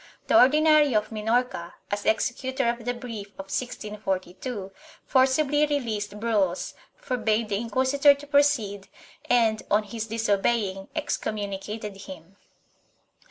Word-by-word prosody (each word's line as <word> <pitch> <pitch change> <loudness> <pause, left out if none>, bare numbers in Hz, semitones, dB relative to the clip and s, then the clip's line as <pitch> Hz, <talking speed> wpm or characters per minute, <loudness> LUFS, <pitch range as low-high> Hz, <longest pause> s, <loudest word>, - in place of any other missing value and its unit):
The - - +4
Ordinary 300 -1 +5
of 215 +1 +1
Minorca, 220 -4 -1 0.2
as 205 0 -2
executor 260 +3 0
of 235 -1 -4
the 245 - 0
brief 230 -5 -7
of 195 0 -8
1642, 205 -2 -4 0.3
forcibly 285 +3 +3
released 215 -8 -2
Bruells, 205 -6 0 0.2
forbade 225 -3 -1
the 200 - 0
inquisitor 260 +5 +3
to 285 +1 -11
proceed 280 -9 +1 0.4
and, 225 -3 +3
on 210 +1 +3
his 220 +2 -5
disobeying, 205 -2 0
excommunicated 210 -6 -4
him. 190 -1 -11
225 Hz, 115 wpm, -26 LUFS, 205-260 Hz, 0.4 s, Ordinary